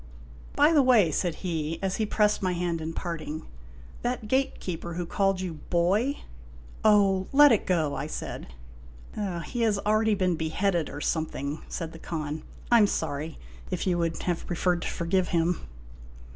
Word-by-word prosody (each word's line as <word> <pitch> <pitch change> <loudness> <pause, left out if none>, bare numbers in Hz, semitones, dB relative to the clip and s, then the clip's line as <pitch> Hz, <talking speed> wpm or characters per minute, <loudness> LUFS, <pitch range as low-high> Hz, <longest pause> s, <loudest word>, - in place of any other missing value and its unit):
By 300 +2 +5
the 295 - +6
way," 235 -10 +5
said 170 +2 0
he, 160 -2 -2
as 190 -1 0
he 220 - 0
pressed 210 0 +2
my 185 -2 +1
hand 170 -2 -1
in 160 +1 -3
parting, 160 -2 -5 0.3
" 60 0 -18
that 245 -2 -2
gatekeeper 180 -9 -1
who 175 0 -2
called 195 +2 +1
you 180 -3 -3
' - - -20
boy 195 +11 +2 0.2
' 60 - -18
" - - -19
" - - -18
Oh, 200 -3 +4
let 290 0 +8
it 220 - +2
go," 160 -6 +1
I 140 +2 -3
said. - - -6 0.5
" 170 - -5
He 240 - -3
has 220 -3 +3
already 215 0 +3
been 185 -3 +1
beheaded, 165 +1 0
or 145 - -7
something," 150 -2 -2
said 165 -2 -4
the 165 - -11
Khan. 155 -2 -4 0.2
" - - -19
I 235 - +7
'm 210 - +6
sorry, 155 -2 -3 0.3
if 180 -2 -2
you 180 -2 +1
would 165 -1 -1
have 175 -2 -2
preferred 175 0 0
to - - -3
forgive 180 +2 0
him." 170 - 0
175 Hz, 190 wpm, -27 LUFS, 160-205 Hz, 0.5 s, let